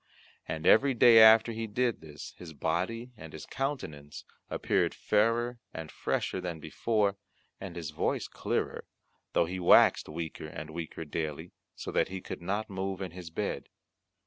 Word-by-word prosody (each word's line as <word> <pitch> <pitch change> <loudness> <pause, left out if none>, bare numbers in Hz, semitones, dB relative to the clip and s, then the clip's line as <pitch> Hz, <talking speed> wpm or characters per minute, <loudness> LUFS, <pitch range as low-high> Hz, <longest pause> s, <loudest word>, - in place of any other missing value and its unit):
And 80 +1 -4
every 135 +3 +5
day 115 -1 +8
after 110 +1 +8
he 115 0 -4
did 120 +2 0
this, 75 -2 -10
his 85 -3 -10
body 95 - -2
and 80 -7 -11
his 80 - -8
countenance 80 - -5 0.2
appeared - - 0
fairer 115 +3 +1 0.2
and 80 -1 -6
fresher 95 - -2
than 85 -3 -4
before, 105 +4 0 0.4
and 95 -3 -7
his 85 -3 -5
voice - - -1
clearer, - - -3 0.5
though - - +3
he 90 +2 -4
waxed 85 - +5
weaker 80 0 -5
and 80 0 -8
weaker 80 0 -6
daily, 80 +2 -4 0.2
so - - -6
that - - +2
he 95 0 -5
could - - -7
not 100 +5 -2
move 95 -1 -4
in 95 -3 -5
his 90 -1 -9
bed. 80 - -3
90 Hz, 160 wpm, -30 LUFS, 80-110 Hz, 0.5 s, day